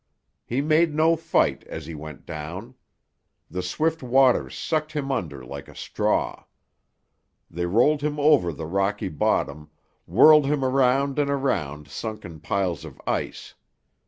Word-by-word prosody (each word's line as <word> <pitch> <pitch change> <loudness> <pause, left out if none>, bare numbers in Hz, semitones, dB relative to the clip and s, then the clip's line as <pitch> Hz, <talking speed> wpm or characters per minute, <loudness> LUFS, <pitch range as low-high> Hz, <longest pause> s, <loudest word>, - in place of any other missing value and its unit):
He 125 +4 0
made 155 +1 +2
no 160 +2 +4
fight 165 - +1
as 80 -2 -7
he 80 - -7
went 75 -1 -9
down. 85 +11 -7 0.8
The 90 +2 -3
swift 160 - -1
waters 125 - +3
sucked 155 -1 -2
him 140 -2 -2
under 80 - -4
like - - -8
a - - -14
straw. - - -1 1.1
They 85 +1 -2
rolled 125 +10 +3
him 150 0 -2
over 145 - +4
the 80 +1 -7
rocky 100 +3 -1
bottom, 75 -1 -1 0.4
whirled 150 -2 +6
him 140 -2 0
around 135 +2 +2
and 145 -1 +1
around 80 - -1
sunken 100 -7 -7
piles 90 +1 -2
of - - -11
ice. - - -3
120 Hz, 140 wpm, -24 LUFS, -, 1.1 s, whirled